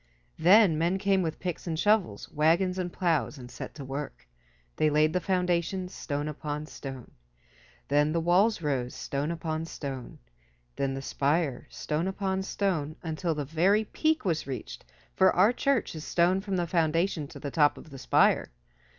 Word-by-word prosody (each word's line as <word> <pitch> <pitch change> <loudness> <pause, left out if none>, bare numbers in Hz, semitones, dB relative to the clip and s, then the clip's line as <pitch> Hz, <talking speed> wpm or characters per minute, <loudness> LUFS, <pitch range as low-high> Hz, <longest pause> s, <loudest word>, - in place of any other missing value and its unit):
Then 180 -2 +6
men 170 +3 +1
came 195 -1 +2
with 160 -3 -3
picks 180 -1 -4
and 160 -2 -2
shovels, 200 - +1
wagons 170 +5 +2
and 180 -1 -2
plows, 165 -5 0
and 125 -1 -10
set - - -8
to 140 -3 -7
work. 135 - -6 0.5
They 155 - +3
laid 155 +1 +3
the 180 - +2
foundations, 180 0 -1
stone 145 0 -3
upon 150 0 -4
stone. 135 -5 -9 0.8
Then 145 +2 +3
the 165 - +1
walls 180 +4 +3
rose, 130 -4 -1
stone 140 +2 -3
upon 165 -1 -3
stone. 135 -6 -7 0.6
Then 135 -1 -1
the 135 - -5
spire, 140 -1 0
stone 155 +4 -2
upon 190 0 -1
stone, 175 -6 -1
until 165 0 -2
the 145 -1 -3
very 180 +9 +2
peak 315 +4 0
was 165 -6 0
reached, 130 -3 -6 0.3
for 190 -1 +4
our 200 +7 +5
church 270 -3 0
is 155 -2 -7
stone 180 +4 +2
from 195 -1 -3
the 175 -1 0
foundation 165 -1 0
to - - -11
the 140 - -5
top 150 -1 +3
of 155 - -13
the 135 - -9
spire. - - +3
165 Hz, 170 wpm, -28 LUFS, 150-185 Hz, 0.8 s, Then